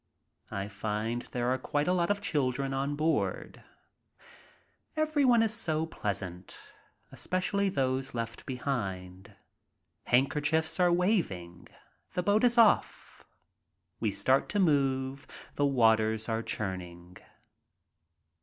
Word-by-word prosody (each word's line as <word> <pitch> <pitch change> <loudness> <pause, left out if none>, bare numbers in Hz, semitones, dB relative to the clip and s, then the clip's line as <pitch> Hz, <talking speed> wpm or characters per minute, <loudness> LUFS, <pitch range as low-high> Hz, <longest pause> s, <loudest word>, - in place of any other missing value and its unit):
I 100 0 -4
find 105 +4 -3
there 125 0 0
are 130 - -2
quite 145 +4 -1
a 180 - +3
lot 175 -1 +1
of 205 0 0
children 135 -6 -1
on 140 +2 -1
board. 155 +2 -1 1.3
Everyone 285 -7 +3
is 220 -1 +1
so 160 -8 +1
pleasant, 95 - -5 0.5
especially 195 +2 -1
those 130 -5 -1
left 115 0 -5
behind. 100 -7 -4 0.7
Handkerchiefs 150 +6 +1
are 180 -1 +4
Waving. 170 - -1 0.5
The 180 0 -1
boat 205 +5 +2
is 240 0 +3
off. 230 -2 +2 0.7
We - - 0
start - - +1
to 205 - 0
move, 135 -5 +1 0.3
the 145 - +1
waters 110 -4 +2
are 115 -1 -1
churning. 90 -4 -6
135 Hz, 110 wpm, -30 LUFS, 110-175 Hz, 1.3 s, are